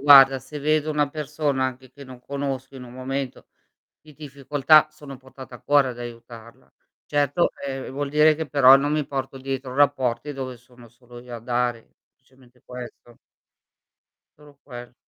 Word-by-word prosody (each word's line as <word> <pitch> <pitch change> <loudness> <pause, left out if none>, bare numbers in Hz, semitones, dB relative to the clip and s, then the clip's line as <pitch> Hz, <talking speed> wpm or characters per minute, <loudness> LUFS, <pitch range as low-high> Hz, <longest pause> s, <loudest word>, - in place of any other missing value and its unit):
guarda, 135 -1 +8
se 135 +4 -9
vedo 155 +1 +1
una 150 -2 +1
persona 150 -2 -2
anche 130 0 -8
che 140 - -13
non 130 -2 -12
conosco 135 0 -5
in 130 - -9
un 120 -1 -11
momento 130 +1 -5 0.5
di 155 - -18
difficoltà 145 +1 +3
sono 145 -3 -11
portata 130 -1 -13
a - - -15
cuore 140 -2 +3
ad 120 - -8
aiutarla. 115 -1 -11 0.3
Certo, 145 +3 +1 0.2
ehm, 135 -1 -5
vuol 140 +1 -3
dire 150 +1 +4
che 160 0 -5
però 135 -1 +7
non 140 +2 +1
mi 150 -1 0
porto 135 -1 -5
dietro 135 -1 -5
rapporti 135 -2 +1
dove 130 -2 -6
sono 125 0 -18
solo 120 +1 -15
io 120 0 -9
a - - -8
dare, 120 0 -3 0.2
semplicemente 130 -1 -25
questo. 120 -1 -11 1.2
Solo 145 -2 -18
quel 120 -2 -11
135 Hz, 165 wpm, -23 LUFS, 125-145 Hz, 1.2 s, guarda